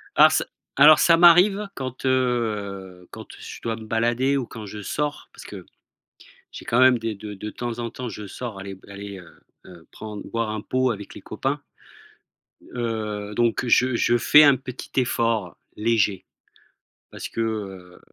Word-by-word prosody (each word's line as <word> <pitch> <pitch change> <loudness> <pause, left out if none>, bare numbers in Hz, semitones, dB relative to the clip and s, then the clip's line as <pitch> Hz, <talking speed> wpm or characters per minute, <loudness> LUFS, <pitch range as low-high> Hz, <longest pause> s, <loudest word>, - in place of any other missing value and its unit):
Alors - - +8
ç - - +2 0.3
alors 150 0 +8
ça 165 +1 +5
m'arrive 185 +4 +6
quand, 130 0 -6
heu, 105 -8 -1
quand - - -10
je - - -9
dois 115 -1 -2
me 110 -1 -10
balader 120 +5 +1
ou 130 - -2
quand 110 -2 -9
je 105 +1 -8
sors, 150 +7 -3
parce - - -12
que - - -10 0.9
j'ai - - -9
quand 120 - +1
même 130 -2 +6
des 115 -1 -3
de 105 +1 -8
de 105 +2 -7
temps 120 -1 -5
en 120 0 -3
temps, 125 -1 -6
je 105 -1 -8
sors 110 0 -7
aller 95 0 -7
b 95 - -21
allez, 100 -1 -8
heu 90 - -13 0.4
heu, 85 -3 -15
prendre 105 -1 -8
boire 115 -1 -2
un 110 -1 -3
pot 130 +3 0
avec 105 -2 -6
les - - -10
copains, - - -3 1.1
heu, 105 -3 -3
donc 120 +2 +1
je 125 +1 +3
je 120 +1 +2
fais 150 +7 +7
un 140 -2 +6
petit 125 -1 -9
effort, 115 -7 -1 0.2
léger, 105 -3 +1 0.9
parce - - -7
que, 115 - -3
heu, 95 -5 -5
115 Hz, 175 wpm, -23 LUFS, 105-125 Hz, 1.1 s, Alors